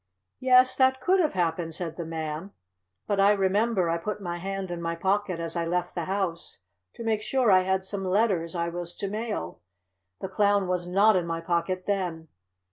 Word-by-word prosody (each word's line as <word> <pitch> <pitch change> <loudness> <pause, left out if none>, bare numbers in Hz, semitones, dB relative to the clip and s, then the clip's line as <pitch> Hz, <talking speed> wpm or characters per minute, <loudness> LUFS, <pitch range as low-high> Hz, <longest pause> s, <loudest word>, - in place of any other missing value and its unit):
"Yes, 255 0 +5
that 260 0 +4
could 370 +9 +2
have 315 -4 +2
happened," 165 -2 -1
said 170 -2 -4
the 170 -2 -5
Man. 160 +3 -5 0.5
"But 200 -1 -1
I 200 +1 +6
remember 200 0 +1
I 165 0 0
put 210 +4 -4
my 175 -3 -4
hand 195 0 -4
in 175 -1 -4
my 170 0 -2
pocket 190 0 0
as 165 +1 -3
I 170 - 0
left 175 +1 -1
the 170 -2 -3
house, 185 - -3 0.3
to - - -7
make 220 -2 0
sure 245 -1 +2
I 185 -1 +6
had 190 0 0
some 195 +1 -3
letters 185 -3 +1
I 170 0 -1
was 175 0 -6
to 200 - -4
mail. 205 - -4 0.6
The - - -4
Clown 200 0 +2
was 180 -1 -1
not 200 +3 +5
in 175 -2 0
my 165 0 -2
pocket 170 +2 -1
then. 175 -5 -2
185 Hz, 200 wpm, -27 LUFS, 170-205 Hz, 0.6 s, I